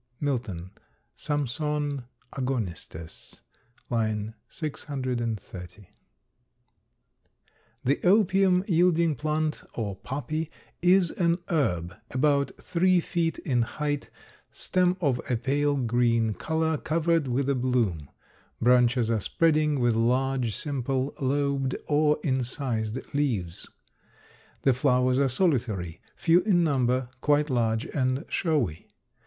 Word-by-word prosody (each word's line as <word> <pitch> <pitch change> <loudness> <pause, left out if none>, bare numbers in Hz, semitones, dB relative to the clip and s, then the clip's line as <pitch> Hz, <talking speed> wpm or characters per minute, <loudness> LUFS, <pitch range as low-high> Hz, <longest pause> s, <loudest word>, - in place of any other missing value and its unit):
Milton, 115 - -3 0.4
S. - - -8
A. 145 -1 +1 0.2
l. 145 -4 -2 2.4
630. 120 - -5 2.0
The 140 +2 +1
opium 190 -1 +4
yielding 170 -3 +3
plant 155 +2 -1
or 105 -4 -3
poppy 145 +8 -4 0.3
is 180 0 +4
an 170 -1 +1
herb 90 - 0
about 140 +1 +2
three 185 +1 +2
feet 170 -1 -1
in 125 -5 0
height; 145 +4 -2 0.4
stem 180 0 +1
of 135 -6 +1
a 125 - +2
pale 145 +4 +1
green 115 -3 +2
color 160 +3 -1
covered 165 -1 +1
with 130 +2 0
a 140 - +3
bloom. 120 - 0 0.5
Branches 125 -1 +3
are 110 - +2
spreading, 155 - +2
with 120 -1 +3
large, 125 0 +1
simple, 135 -2 -2
lobed 140 -1 0
or 150 0 +3
incised 125 -4 -1 0.2
leaves. 110 - -1 1.0
The 135 - +5
flowers 125 0 +2
are 140 -1 +3
solitary, 120 - 0
few 170 +1 +4
in 180 -3 +3
number, 130 -4 +1
quite 150 +1 +2
large 115 -2 +1
and 130 +2 -1
showy. 140 - -1
135 Hz, 105 wpm, -27 LUFS, 120-155 Hz, 2.4 s, The